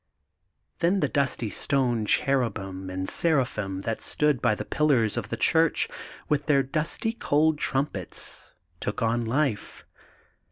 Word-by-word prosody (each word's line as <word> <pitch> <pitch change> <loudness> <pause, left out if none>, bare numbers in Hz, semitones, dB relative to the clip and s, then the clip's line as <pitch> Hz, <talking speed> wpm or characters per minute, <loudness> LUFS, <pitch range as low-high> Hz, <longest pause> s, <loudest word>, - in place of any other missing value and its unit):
' 90 -5 -49
Then 180 +4 +2
the - - +2
dusty 130 -6 -1
stone 120 -6 0
cherubim 100 -10 0
and 95 0 -3
sera 155 -6 +2
phim 95 -5 -4
that 115 +2 -3
stood 150 -4 +1
by 115 -3 +3
the - - -5
pillars 130 -8 +2
of - - -4
the - - -3
church, - - +3 0.4
with 150 0 0
their 140 -3 +4
dusty 155 +10 -2
cold 155 -7 +2
trumpets, 135 - -3 0.3
took 105 +3 -3
on 115 +1 +1
life. 130 -2 -1
130 Hz, 145 wpm, -26 LUFS, 105-150 Hz, 0.4 s, their